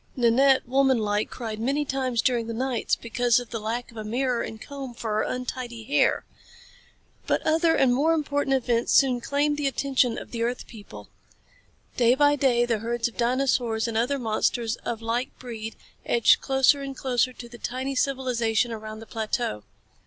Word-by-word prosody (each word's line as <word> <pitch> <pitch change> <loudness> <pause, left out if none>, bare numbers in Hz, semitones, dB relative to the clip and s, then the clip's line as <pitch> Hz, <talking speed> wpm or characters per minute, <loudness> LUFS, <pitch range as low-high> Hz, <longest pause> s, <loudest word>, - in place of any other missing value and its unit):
Nanette, 260 +2 +4
womanlike, 235 -6 +2
cried 220 -3 -6
many 275 +6 0
times 260 -4 -1
during 240 -3 +1
the 230 - -4
nights 255 -1 0
because 240 0 +1
of 245 -2 -9
the 230 - -3
lack 230 +3 -4
of 230 - -15
a 215 - -4
mirror 245 +2 -1
and 220 - -6
a - - -10
comb 275 -4 -7
for 225 -2 -4
her - - +2
untidy 250 -2 -4
hair. 270 - +2 1.0
But - - 0
other 325 +1 +3
and 255 -2 +3
more 300 +6 +3
important 285 -3 0
events 240 -2 0
soon 255 -3 +4
claimed 290 +3 0
the 290 -1 0
attention 265 -3 +1
of - - -8
the 230 - -4
earth 240 +2 -2
people. 210 -3 -12 0.9
Day 245 0 +4
by 290 +1 +4
day 250 -4 +2
the 230 -3 0
herds 235 +1 -1
of 235 - -10
dinosaurs 240 -2 +1
and 230 - -4
other 245 +5 +1
monsters 230 -1 0
of 230 -1 -5
like 235 +3 -2
breed 225 -3 -7 0.3
edged 235 -2 +4
closer 270 +1 +3
and 275 -1 -6
closer 255 -1 +1
to 240 - -10
the 240 0 -13
tiny 260 +4 -3
civilization 250 -4 0
around 215 0 -7
the - - -9
plateau. 220 - -2
245 Hz, 180 wpm, -25 LUFS, 230-270 Hz, 1.0 s, Nanette